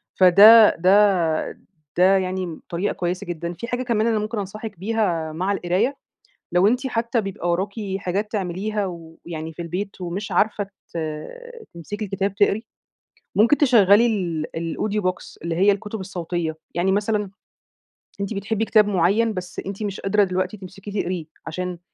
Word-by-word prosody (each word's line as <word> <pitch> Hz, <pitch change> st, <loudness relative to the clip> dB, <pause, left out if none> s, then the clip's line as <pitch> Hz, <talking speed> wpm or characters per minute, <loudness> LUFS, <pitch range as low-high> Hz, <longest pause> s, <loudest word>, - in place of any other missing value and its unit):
فده 205 Hz, +4 st, +8 dB
ده 185 Hz, -3 st, +3 dB, 0.4 s
ده 190 Hz, +2 st, +5 dB
يعني 185 Hz, -3 st, -3 dB
طريقة 180 Hz, +4 st, -1 dB
كويِسة 180 Hz, 0 st, -3 dB
جدًا. 170 Hz, 0 st, -4 dB
في 235 Hz, -, -7 dB
حاجة 245 Hz, +1 st, -2 dB
كمان 230 Hz, -2 st, +1 dB
أنا 225 Hz, -2 st, +2 dB
ممكن 215 Hz, +2 st, -3 dB
أنصحِك 205 Hz, 0 st, -6 dB
بيها 185 Hz, -6 st, -1 dB
مع 185 Hz, +5 st, -1 dB
القراية، 200 Hz, +8 st, 0 dB, 0.6 s
لو 180 Hz, +2 st, +4 dB
أنتِ 250 Hz, +5 st, +1 dB
حتى 235 Hz, -1 st, 0 dB
بيبقى 195 Hz, -4 st, -3 dB
وراكِ 190 Hz, +4 st, -1 dB, 0.3 s
حاجات 195 Hz, +3 st, -2 dB
تعملِيها 200 Hz, +1 st, -2 dB
و 165 Hz, -2 st, -9 dB
يعني 160 Hz, -1 st, -5 dB
في 170 Hz, +2 st, -7 dB
البيت 185 Hz, +4 st, -5 dB
ومش 185 Hz, +3 st, -4 dB
عارفة 210 Hz, -1 st, +2 dB
ت 195 Hz, -3 st, -11 dB, 0.8 s
تمسَكِي 205 Hz, +6 st, -6 dB
الكتاب 195 Hz, 0 st, -2 dB
تقرِيه، 205 Hz, +1 st, +2 dB, 0.8 s
ممكن 230 Hz, +8 st, +5 dB
تشغِّلي 230 Hz, -5 st, +5 dB
ال 175 Hz, -9 st, -1 dB
الaudio 200 Hz, +6 st, -2 dB
book 185 Hz, 0 st, 0 dB, 0.3 s
اللي 170 Hz, -1 st, -2 dB
هي 195 Hz, +4 st, +5 dB
الكُتب 210 Hz, +2 st, -4 dB
الصوتية. 175 Hz, -3 st, -3 dB, 0.2 s
يعني 180 Hz, +3 st, +1 dB
مثلًا 205 Hz, 0 st, 0 dB, 0.9 s
أنتِ 200 Hz, +2 st, -3 dB
بتحِبِّي 205 Hz, +2 st, -1 dB
كتاب 215 Hz, -2 st, +4 dB
معيَّن، 205 Hz, +4 st, +2 dB
بس 180 Hz, -2 st, -5 dB
أنتِ 195 Hz, +2 st, -5 dB
مش 205 Hz, -2 st, -3 dB
قادرة 205 Hz, +1 st, +3 dB
دلوقتي 185 Hz, +2 st, -2 dB
تمسَكِيه 195 Hz, +2 st, -5 dB
تقرِيه 175 Hz, -2 st, -3 dB, 0.2 s
عشان 180 Hz, +2 st, -4 dB
195 Hz, 155 wpm, -22 LUFS, 175-210 Hz, 0.9 s, فده